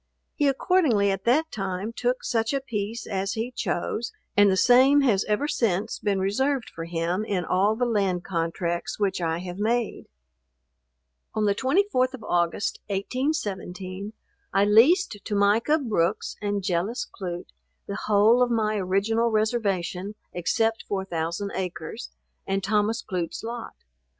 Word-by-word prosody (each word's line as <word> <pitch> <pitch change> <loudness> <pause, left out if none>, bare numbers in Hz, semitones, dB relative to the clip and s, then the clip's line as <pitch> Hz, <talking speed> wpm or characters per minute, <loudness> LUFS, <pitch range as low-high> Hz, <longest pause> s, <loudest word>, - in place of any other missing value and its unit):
He 290 - +1
accordingly 270 - +3
at 195 0 -4
that 310 +7 +2
time 195 +2 -3
took 245 +2 -1
such 225 +1 0
a - - +1
piece 225 -3 -4
as 195 -1 -2
he 225 +3 -3
chose, 215 +1 -2 0.2
and 205 0 +6
the 190 - +2
same 260 +6 +6
has 220 -8 +3
ever 215 +7 0
since 220 -6 0
been 205 -2 0
reserved 255 +7 0
for 165 - -6
him 170 +4 -1
in 195 -5 -1
all 195 +5 +2
the 245 +2 0
land 195 -6 0
contracts 170 0 -2
which 195 -3 0
I 165 -1 0
have 180 +1 -7
made. 230 +2 0 1.3
On 215 -1 +1
the 200 - +3
24th 260 - +1
of 235 - -13
August, 175 0 0
1817, 200 - -3 0.4
I 195 - +3
leased 230 - +5
to 210 - -3
Micah 210 +9 +3
Brooks 215 - -1
and 205 -1 -1
Jellis 190 +6 -1
Clute, 175 -2 -6 0.3
the 200 - -5
whole 215 +4 +5
of 250 - +4
my 215 -2 +1
original 205 +5 +1
reservation, 210 -3 -1 0.2
except 225 +6 0
4000 190 0 -2
acres, 180 - -5 0.4
and 195 0 -1
Thomas 215 +3 +1
Clute's 180 -4 -4
lot. 235 0 -6
205 Hz, 145 wpm, -25 LUFS, 190-235 Hz, 1.3 s, and